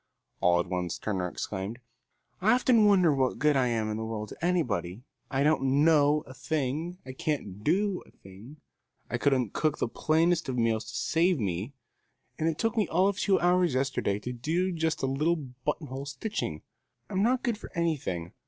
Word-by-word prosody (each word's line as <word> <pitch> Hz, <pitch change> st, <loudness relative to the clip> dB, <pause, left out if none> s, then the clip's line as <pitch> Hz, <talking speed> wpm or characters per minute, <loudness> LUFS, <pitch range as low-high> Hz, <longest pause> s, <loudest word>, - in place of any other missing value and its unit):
All 90 Hz, 0 st, +4 dB
at 90 Hz, -, 0 dB
once 90 Hz, -1 st, -3 dB
Turner 95 Hz, -4 st, -2 dB
exclaimed: 95 Hz, +4 st, -5 dB, 0.6 s
"I 215 Hz, +5 st, +5 dB
often 240 Hz, -3 st, +4 dB
wonder 185 Hz, -6 st, +5 dB
what 130 Hz, -2 st, 0 dB
good 150 Hz, -1 st, +3 dB
I 130 Hz, -2 st, +3 dB
am 115 Hz, -2 st, 0 dB
in 105 Hz, -, -2 dB
the 110 Hz, -, -3 dB
world 110 Hz, -2 st, -4 dB
to -, -, -11 dB
anybody. 115 Hz, -, 0 dB, 0.3 s
I 135 Hz, 0 st, +1 dB
don't 145 Hz, -2 st, +3 dB
know 150 Hz, -2 st, +4 dB
a 130 Hz, -, -11 dB
thing, 150 Hz, +5 st, -2 dB
I 130 Hz, -, -6 dB
can't 130 Hz, -8 st, -3 dB
do 190 Hz, -, +1 dB
a -, -, -18 dB
thing. 100 Hz, +10 st, -14 dB, 0.5 s
I 120 Hz, -, -1 dB
couldn't 130 Hz, -6 st, +1 dB
cook 155 Hz, -1 st, 0 dB
the -, -, 0 dB
plainest 165 Hz, +7 st, +1 dB
kind 130 Hz, -2 st, -3 dB
of -, -, +1 dB
a -, -, +3 dB
meal 115 Hz, -1 st, +2 dB
to 110 Hz, -, -10 dB
save 165 Hz, +7 st, +1 dB
me, 100 Hz, +5 st, -2 dB, 0.7 s
and 160 Hz, -, +2 dB
it 160 Hz, -, -3 dB
took 225 Hz, +4 st, 0 dB
me 215 Hz, -5 st, +2 dB
all 185 Hz, +4 st, +3 dB
of 200 Hz, 0 st, -3 dB
two 195 Hz, -2 st, +3 dB
hours 175 Hz, -4 st, +3 dB
yesterday 130 Hz, -6 st, 0 dB
to 125 Hz, +4 st, -4 dB
do 165 Hz, +10 st, -1 dB
just 160 Hz, -3 st, -1 dB
a -, -, +4 dB
little 150 Hz, +6 st, +1 dB
buttonhole 140 Hz, 0 st, -5 dB
stitching. 135 Hz, -, -4 dB, 0.4 s
I'm 190 Hz, -, -1 dB
not 245 Hz, +4 st, +2 dB
good 235 Hz, -4 st, -1 dB
for -, -, -10 dB
anything. 145 Hz, -, -2 dB
140 Hz, 195 wpm, -28 LUFS, 115-170 Hz, 0.7 s, I